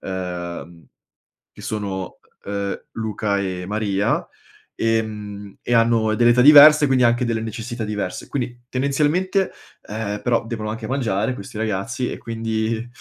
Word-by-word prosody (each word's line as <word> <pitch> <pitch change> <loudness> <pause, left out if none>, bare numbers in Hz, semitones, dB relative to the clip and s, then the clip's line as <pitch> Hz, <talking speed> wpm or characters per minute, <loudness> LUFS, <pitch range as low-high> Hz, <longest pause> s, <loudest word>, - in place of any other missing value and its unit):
uhm, 85 -2 -6 0.7
che - - -13
sono, 100 -3 -4 0.3
uhm, 100 0 -3
Luca 105 -2 -2
e 95 -2 -3
Maria, 100 -1 0 0.5
ehm, 105 -3 -2
e - - -3
hanno 115 -1 +3
delle 120 +1 +4
età 125 +1 +5
diverse 150 +1 +9
quindi 130 -2 +3
anche 120 +1 +3
delle 115 -2 -1
necessità 115 +2 -5
diverse, 105 -3 -4
quindi 120 -2 -4
tendenzialmente, 150 +9 +1 0.4
ehm, 105 -1 -3
però 120 -2 +1
devono 110 -2 -4
anche 110 0 -5
mangiare 115 -3 0
questi 100 -1 -9
ragazzi 110 +3 -2
e - - -6
quindi, 115 0 -2
110 Hz, 135 wpm, -21 LUFS, 100-120 Hz, 0.7 s, diverse